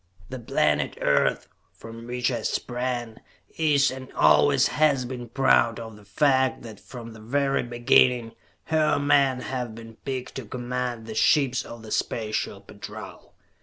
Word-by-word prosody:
The 130 - -6
planet 75 -10 0
Earth, - - +1 0.3
from 115 +1 -11
which 125 +1 -1
I 120 -2 -2
sprang, 120 -1 -3 0.4
is 150 -3 +3
and 130 0 -9
always 140 -1 +4
has 145 -4 +2
been 120 -1 -7
proud 120 -2 +3
of 110 -2 -8
the 105 -1 -17
fact 130 +6 +1
that 110 -3 -10
from 115 -3 -10
the 110 - -13
very 135 +5 0
beginning, 120 0 +3 0.3
her 155 -1 +2
men 140 -3 +3
have 125 -3 -4
been 115 -1 -12
picked 130 -2 -5
to 130 - -6
command 125 -1 -4
the 110 - -7
ships 130 +2 +2
of 115 -1 -10
the 110 - -10
Special 110 -2 -2
Patrol. - - -11
125 Hz, 150 wpm, -25 LUFS, 115-135 Hz, 0.4 s, always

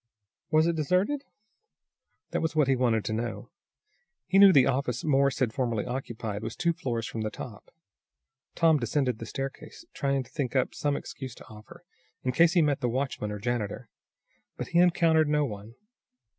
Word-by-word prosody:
Was 155 +1 +4
it 170 0 +1
deserted? 185 - 0 1.1
That - - -1
was 160 0 -2
what 150 -3 +3
he 135 - +3
wanted 120 -4 +1
to 110 - -2
know. 115 +2 -4 0.7
He 195 - +3
knew 200 -1 +9
the 135 -7 +6
office 125 -2 -1
Morse 140 -2 +2
had 120 -4 0
formerly 120 -4 -1
occupied 115 -5 -4
was - - -5
two 170 -1 +1
floors 120 -8 -3
from 115 - -5
the 110 - -1
top. 105 -1 -10 0.9
Tom 160 -3 +4
descended 125 -1 0
the 115 - -7
staircase, 135 - -7
trying 140 -1 0
to - - -20
think 140 -4 -3
up 130 - +1
some 145 -1 -1
excuse 130 -3 -8
to - - -14
offer, 110 0 -13 0.4
in 130 - 0
case 165 +5 +4
he 175 -3 +4
met 145 -2 0
the 125 - +1
watchman 130 -4 -2
or 105 - -4
janitor. 115 0 -3 0.7
But - - -5
he 170 - +3
encountered 165 -3 +4
no 150 0 +2
one. 105 -1 -8
135 Hz, 180 wpm, -28 LUFS, 115-155 Hz, 1.1 s, knew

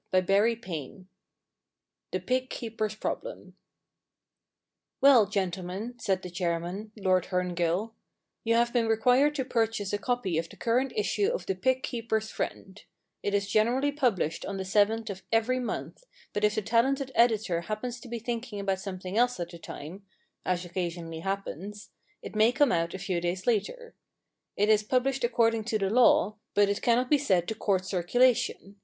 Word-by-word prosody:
XII 190 - 0 1.0
THE - - -2
PIG 255 0 -1
KEEPER^S 220 -3 -4
PROBLEM - - -5 0.7
* - - -61
Well, 260 -7 +7
gentlemen/ 195 +4 -3
said 190 -4 0
the 180 - -7
chairman, 175 +4 -3
Lord 185 -3 +2
Herngill, 180 +3 -1 0.2
* - - -57
you 230 0 +2
have 235 0 +2
been 235 -2 +2
required 250 +6 +3
to 265 -3 -1
purchase 225 -5 -1
a 205 - 0
copy 205 -7 0
of 165 0 -4
the - - -13
current 250 +3 +1
issue 420 -1 +1
of - - -2
The - - 0
Pig 260 +8 0
Keepers' 220 -2 -2
Friend, 190 +1 -5 0.4
It 205 - -1
is 200 0 0
generally 240 +7 +2
published 240 - 0
on 200 - -4
the 190 - -4
seventh 210 +3 +2
of 190 -1 -8
every 225 +3 +2
month, 250 - -5 0.3
but 205 - -2
if 210 0 +3
the 215 - -1
talented 265 +5 +1
editor 220 -7 +2
happens 225 +6 -4
to 255 - -12
be 235 0 -4
thinking 230 -1 -4
about 195 -1 -1
some 190 -1 -5
thing 185 +4 -3
else 245 -3 +2
at 175 - -4
the 170 - -10
time— 170 +6 -9 0.4
as 180 0 -1
occasionally 170 -2 -4
happens 195 +2 -5
— - - -39
it - - -8
may 220 +2 +5
come 280 +1 +3
out 170 0 0
a - - -3
few 185 -2 -2
days 175 +2 -2
later. 355 - -1 0.6
It 205 - +3
is 215 -1 +5
published 255 +4 0
according 230 -2 +2
to 215 - 0
the 195 -2 -1
law, 215 -3 +4 0.2
but 205 -1 +4
it 200 - -1
cannot 245 +2 +2
be 295 - +5
said 185 -11 +1
to - - -1
court 195 -4 0
circulation. 205 +2 +1
215 Hz, 175 wpm, -28 LUFS, 190-240 Hz, 1.0 s, Well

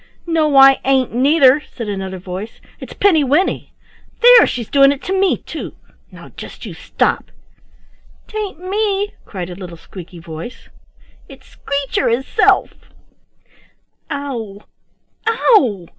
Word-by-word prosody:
"No 315 -4 +1
I 270 0 +7
ain't, 265 -3 +1
neither," 275 +2 +4 0.2
said 230 -3 -5
another 190 -2 -5
voice. 185 +4 -8 0.2
"It's - - -10
Pinny 340 -7 +3
winny. 290 +8 0 0.5
There, 485 -1 +8
she's 235 -3 -4
doing 275 -1 +5
it 280 - -5
to 380 - -3
me, 385 0 +2
too. - - -8 0.4
Now - - -13
just - - -11
you - - -7
stop." - - -2 1.0
"'Tain't 420 -6 -6
me," 410 0 -1
cried 180 -3 -7
a - - -8
little 175 -3 -9
squeaky 175 +1 -12
voice; 165 +7 -10 0.6
"it's - - -15
Screecher 280 -3 -2
hisself. 265 - +1 1.4
Ow! 235 -8 -6 0.6
Ow! 300 - +2
270 Hz, 125 wpm, -17 LUFS, 200-335 Hz, 1.4 s, There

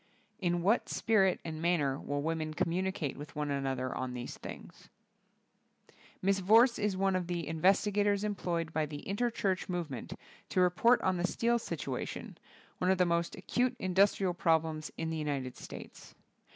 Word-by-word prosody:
In 175 -2 0
what 210 +6 +2
spirit 195 -4 +2
and 160 -1 -5
manner 150 -6 +1
will 145 0 -3
women 160 -1 -2
communicate 180 -3 -1
with 145 +1 -9
one 150 -1 -2
another 135 -2 -2
on 130 -1 -3
these 120 0 -5
things? - - -10 1.4
Mrs. 195 0 +3
Vorse 230 +6 +5
is 205 -3 0
one 195 0 +2
of 180 -2 -1
the 175 -2 -2
investi 185 +6 +2
gators 205 0 +2
employed 175 -5 -2
by 155 -1 0
the 145 -1 -7
Interchurch 200 -3 -1
movement 160 -9 -4 0.4
to - - 0
report 185 +7 +4
on 185 -1 +2
the 175 +1 +1
steel 235 +4 +1
situa - - -4
tion, - - -7 0.4
one 180 - +1
of 190 - +4
the 180 - +4
most 170 0 0
acute 250 0 0
industrial 190 -1 +2
problems 160 -3 +1
in 160 0 -2
the 160 - -2
United 140 -4 -3
States. - - -10
175 Hz, 165 wpm, -32 LUFS, 155-195 Hz, 1.4 s, Vorse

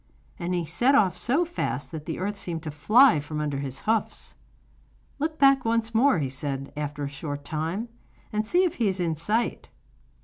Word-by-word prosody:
And 175 +1 -1
he 175 -1 -1
set 240 - +3
off 190 -9 +4
so 275 - +1
fast 320 - -3
that 155 -2 -7
the - - -3
earth 205 +3 -2
seemed 170 -5 -4
to 155 - -4
fly 215 - +5
from 150 +1 -5
under 145 -2 -2
his 135 -1 -4
hoofs. 220 0 -1 0.9
'Look 310 +2 -2
back 275 -2 +5
once 230 0 0
more,' 245 0 +4
he 145 -4 0
said, 135 +1 -4
after 145 0 -4
a - - -1
short 145 0 -6
time, 165 +9 -3 0.5
'and 215 0 0
see 355 +9 +3
if 360 - -1
he 230 - +2
is 190 -1 0
in 165 -3 0
sight. 210 +9 -1
180 Hz, 195 wpm, -26 LUFS, 150-230 Hz, 0.9 s, fly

